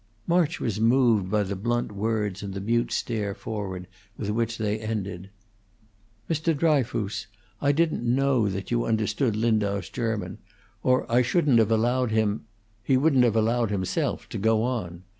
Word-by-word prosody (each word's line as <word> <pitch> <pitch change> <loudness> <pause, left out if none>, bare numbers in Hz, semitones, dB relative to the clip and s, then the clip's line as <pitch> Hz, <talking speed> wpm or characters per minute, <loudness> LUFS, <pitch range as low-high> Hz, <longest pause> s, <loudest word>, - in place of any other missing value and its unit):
March 170 -1 +1
was 110 -3 -2
moved 115 -5 +3
by 105 +1 +2
the 100 0 -3
blunt 120 +4 -1
words 105 -1 -2
and 100 -2 -6
the - - -3
mute 115 +4 0
stare 105 -3 -2
forward 100 -6 -5 0.3
with 105 -1 -3
which 115 +1 -1
they 105 -1 -1
ended. 100 -4 -4 1.0
"Mr. 160 0 0
Dryfoos, 125 - 0 0.3
I 140 - +3
didn't 160 -1 +1
know 125 -2 +2
that 95 +3 -5
you 120 0 +1
understood 110 +2 0
Lindau's 105 -4 0
German, 110 -3 -3 0.4
or 130 0 +2
I 120 +1 +3
shouldn't 130 -1 +3
have 110 -1 +3
allowed 120 +3 +2
him 110 -1 0 0.4
he 130 +5 +2
wouldn't 135 -2 +4
have 115 -3 +2
allowed 115 +1 +2
himself 95 -3 -2
to - - -4
go 110 +1 +2
on. 95 -9 -3
110 Hz, 160 wpm, -26 LUFS, 105-125 Hz, 1.0 s, wouldn't